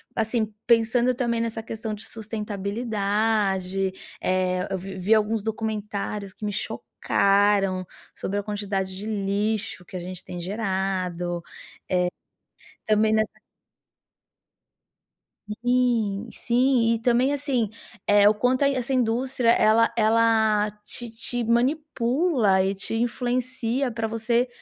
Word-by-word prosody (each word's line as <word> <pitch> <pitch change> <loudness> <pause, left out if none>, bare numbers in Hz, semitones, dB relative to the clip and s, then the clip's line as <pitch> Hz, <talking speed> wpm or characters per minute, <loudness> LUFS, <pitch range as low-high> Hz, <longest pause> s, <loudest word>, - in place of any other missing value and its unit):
assim, 220 -1 0
pensando 235 +2 +3
também 235 -2 0
nessa 225 -1 -3
questão 220 -1 -5
de 210 - -7
sustentabilidade. 205 -3 -1 0.3
Eh, 185 0 0
eu 190 - -1
vi 190 +1 -7
vi 205 +5 +3
alguns 215 0 +1
documentários 210 -2 -3
que 215 - -14
me 205 - -1
chocaram 195 -2 +1 0.3
sobre 200 +2 -3
a - - -4
quantidade 200 -2 -3
de 205 - -6
lixo 205 -1 -1
que - - -12
a - - -4
gente 180 +1 -7
tem 175 -1 -6
gerado, 185 -3 -2 1.5
eh, - - +3
também 215 +1 +3
nessa 215 0 0 2.2
Sim, 240 -4 +1
sim. 245 -1 +2
E 230 - -1
também, 245 +4 +2
assim, 265 -7 0 0.4
eh, 205 0 +6
o - - +3
quanto 250 +5 +1
a 280 - +5
essa 265 0 -1
indústria 250 0 +1
ela 230 0 +5
ela 220 -1 +3
te 240 +2 -6
te 235 +2 -3
manipula 245 - +2
e 195 +1 0
te 200 +3 -2
influencia 245 +1 -1
pra 225 0 -2
você 230 +2 +1
220 Hz, 120 wpm, -25 LUFS, 200-235 Hz, 2.2 s, eh